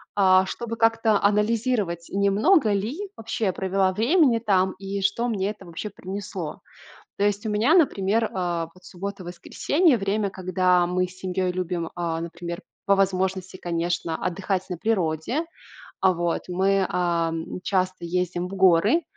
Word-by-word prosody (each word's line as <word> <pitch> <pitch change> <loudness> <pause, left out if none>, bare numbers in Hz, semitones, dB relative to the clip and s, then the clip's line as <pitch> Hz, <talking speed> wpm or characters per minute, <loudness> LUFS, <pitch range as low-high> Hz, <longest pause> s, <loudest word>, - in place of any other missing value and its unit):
а, 190 -2 +5
чтобы 230 +3 -5
как-то 225 -2 +3
анализировать, 210 -4 +1
не 200 0 +1
много 225 - +4
ли 250 - -2
вообще 225 0 -3
я 185 - +1
провела 190 0 +1
времени 235 - +3
там 190 -4 +2
и 195 0 -4
что 205 +5 +1
мне 200 -4 -1
это 210 -2 -8
вообще 175 +5 -6
принесло. 190 -4 -6 0.6
То 200 - 0
есть 205 0 0
у - - -1
меня, 220 +9 +3
например, 225 - +2
а, 175 -3 -2
вот 185 - -19
суббота-воскресенье- 200 - 0
время, 200 0 0
когда 185 -1 +2
мы 180 +1 0
с 185 +1 -15
семьей 185 0 -1
любим, 180 -2 -3
а, 165 -2 -2
например, 170 0 -6 0.2
по 200 - +4
возможности, 190 -1 0
конечно, 170 -1 -2
отдыхать 185 +1 -2
на 180 - -4
природе. 190 - -1 0.6
А, 190 -1 +4
вот, 170 0 -1
мы, 190 +1 +2
а, 170 -2 0 0.3
часто 185 -2 -1
ездим 180 0 -1
в 195 - -7
горы, 190 - +4
190 Hz, 150 wpm, -24 LUFS, 180-210 Hz, 0.6 s, а